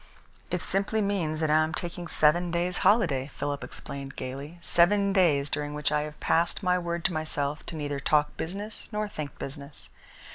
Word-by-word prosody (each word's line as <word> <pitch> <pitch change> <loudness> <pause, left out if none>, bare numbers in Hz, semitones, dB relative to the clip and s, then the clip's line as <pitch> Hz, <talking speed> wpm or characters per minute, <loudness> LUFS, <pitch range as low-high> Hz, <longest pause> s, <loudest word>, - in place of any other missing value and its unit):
"It - - -2
simply 200 +3 0
means 180 -7 0
that 155 -1 +2
I 155 +1 +5
am 160 0 -2
taking 175 -1 -4
seven 170 +3 +3
days' 175 +1 0
holiday," 165 - +3
Philip 145 -1 -2
explained 140 -1 -7
gaily, 140 +6 -6
"seven 195 +4 +3
days 155 -8 +4
during 145 0 -3
which 150 0 0
I 150 0 +2
have 150 0 -6
passed 170 +4 +1
my 180 -1 +3
word 170 -1 -3
to 185 - +2
myself 150 -2 -1
to - - -5
neither 145 -2 -3
talk 150 +1 +2
business 200 +6 -6
nor 210 0 -1
think 155 -8 -6
business. 140 +1 -8
155 Hz, 180 wpm, -28 LUFS, 145-180 Hz, -, I